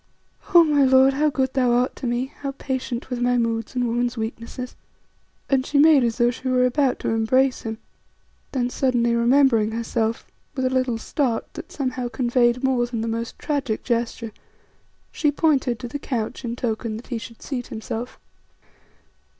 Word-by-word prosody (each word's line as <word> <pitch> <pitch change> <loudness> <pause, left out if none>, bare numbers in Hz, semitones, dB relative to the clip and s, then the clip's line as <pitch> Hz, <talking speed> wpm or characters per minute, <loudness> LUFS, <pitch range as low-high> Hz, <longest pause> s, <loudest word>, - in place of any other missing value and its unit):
"Oh! 340 - +10
my 295 -3 +3
lord, 265 0 +5
how 300 +3 +2
good 260 -1 -1
thou 250 -3 +2
art 245 +1 +1
to 255 - -4
me, 245 +3 -2
how 275 -1 -4
patient 260 -2 -4
with 245 -1 -2
my 245 0 +2
moods 230 0 -1
and 250 -1 +1
woman's 240 +1 -1
weaknesses," 230 +3 -5 0.7
and 265 -2 +2
she 285 - -1
made 295 -2 +6
as 235 -1 0
though 240 -1 +3
she 255 +2 -7
were 255 -1 +3
about 255 +1 +1
to - - -1
embrace 250 +4 +2
him. 225 -1 -5 0.7
Then 245 -2 -1
suddenly 240 -3 +1
remembering 235 -2 +3
herself, 230 0 -2 0.3
with 260 -2 -1
a 255 - +1
little 255 -3 +1
start 240 0 -2
that - - -9
somehow 255 -3 -2
conveyed 240 0 +1
more 255 -2 +2
than 235 -2 -3
the 225 - -2
most 230 +1 -4
tragic 275 -7 -2
gesture, 235 -1 -2 0.8
she 300 - +1
pointed 280 -5 +1
to 245 - -6
the 285 +5 -5
couch 245 -2 -3
in 235 -1 -3
token 225 -2 -3
that 230 - -11
he 230 - -2
should 230 0 -11
seat 250 -4 -4
himself. 225 +2 -6
245 Hz, 175 wpm, -23 LUFS, 235-265 Hz, 0.8 s, Oh